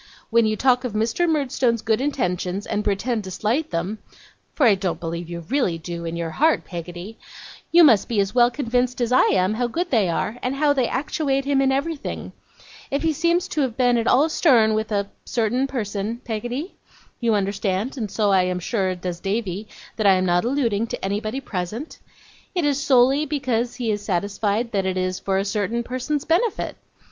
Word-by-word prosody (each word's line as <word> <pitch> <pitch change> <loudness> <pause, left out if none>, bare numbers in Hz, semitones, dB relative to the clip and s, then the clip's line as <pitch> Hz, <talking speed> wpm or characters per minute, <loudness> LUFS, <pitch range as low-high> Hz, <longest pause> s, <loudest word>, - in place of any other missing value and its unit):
When 230 -1 +4
you 215 - +1
talk 255 +2 +3
of 250 -4 -3
Mr. 225 +11 +1
Murdstone's 255 -6 +1
good 220 +1 +1
intentions, 195 -8 -1
and 210 - -2
pretend 215 +3 -1
to - - -6
slight 225 - -1
them 180 +6 -3 0.6
(for 285 - +3
I 225 - +7
don't 190 -2 -2
believe 170 0 -5
you 170 0 -5
really 215 - 0
do, 170 +1 -6
in 165 0 -3
your 170 -1 -3
heart, 315 - +2
Peggotty), 175 +4 -8 0.5
you 340 0 +7
must 230 -10 +5
be 225 -3 +1
as 195 0 0
well 240 -1 +5
convinced 250 -1 -1
as 240 -1 0
I 255 - +6
am 185 +2 +2
how 245 +2 0
good 345 +9 -3
they 215 -8 +3
are, 215 +7 -2
and 255 +2 -1
how 290 +1 +3
they 260 -4 +1
actuate 275 0 -1
him 275 -1 +2
in 270 0 +3
everything. 285 +3 -3 0.6
If 280 +3 -1
he 325 -1 +2
seems 340 +4 +1
to 300 - -1
have 255 -4 -1
been 245 -2 +3
at 230 0 0
all 280 +5 +5
stern 245 -9 +4
with 220 0 -2
a 200 -1 0 0.2
certain 245 +3 0
person, 220 -3 -3
Peggotty 245 - -4 0.5
you 230 -3 +2
understand, 200 +3 -1
and 220 -6 -3
so 205 0 +1
I 190 -1 +5
am 180 0 -1
sure 185 0 -1
does 180 -1 -5
Davy, 200 0 -3 0.3
that 215 -2 +2
I 195 - +7
am 185 0 +1
not 175 0 +2
alluding 235 -4 0
to - - -5
anybody 215 +5 -2
present 215 - -5 0.6
it 350 -4 +1
is 285 -1 +1
solely 270 +2 +4
because 245 -4 -1
he 240 -3 -1
is 205 -1 -2
satisfied 205 +4 -1
that 195 -2 0
it 185 0 -1
is 185 0 -1
for 195 -1 -1
a 195 - 0
certain 210 +3 -1
person's 260 +4 -3
benefit. 390 +7 0
225 Hz, 200 wpm, -23 LUFS, 195-265 Hz, 0.6 s, I